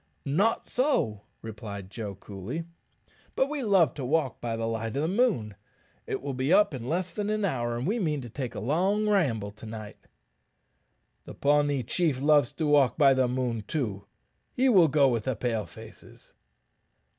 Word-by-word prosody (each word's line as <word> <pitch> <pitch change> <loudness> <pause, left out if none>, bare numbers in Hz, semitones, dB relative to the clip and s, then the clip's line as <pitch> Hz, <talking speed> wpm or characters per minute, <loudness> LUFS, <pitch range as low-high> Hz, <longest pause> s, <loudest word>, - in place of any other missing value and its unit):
"Not 195 +11 +1
so," 245 - 0 0.2
replied 105 -3 -7
Joe, 105 -3 -6
coolly; 100 - -6 0.7
"but 265 - +2
we 300 -2 -3
love 195 -8 +3
to 140 - -6
walk 135 -1 0
by 115 -1 -2
the 115 - -2
light 115 +1 -3
of 140 - 0
the - - +1
moon. 190 - +1 0.5
It - - -3
will 140 -1 -3
be 130 +4 -1
up 205 -4 +5
in 125 -1 -5
less 175 +1 -2
than 210 +1 -2
an 215 -1 0
hour, 120 -8 -1
and 120 - -3
we 220 +7 0
mean 155 -7 0
to 120 - -8
take 130 +1 -5
a - - -3
long 185 - +1
ramble 130 - +1
to 105 +2 -13
night." 110 -1 -8 1.3
"The - - -10
Pawnee 145 -2 +2
chief 155 +1 0
loves 145 -3 +4
to 160 - -2
walk 145 -3 +3
by 140 -3 +6
the 130 -1 +2
moon, 125 -3 -2
too; 105 -10 -3 0.5
he 260 +2 +2
will 185 -8 +6
go 140 -1 +4
with 115 -4 0
the 130 - 0
Pale 110 -3 -2
faces." 85 - -14
135 Hz, 180 wpm, -27 LUFS, 115-170 Hz, 1.3 s, by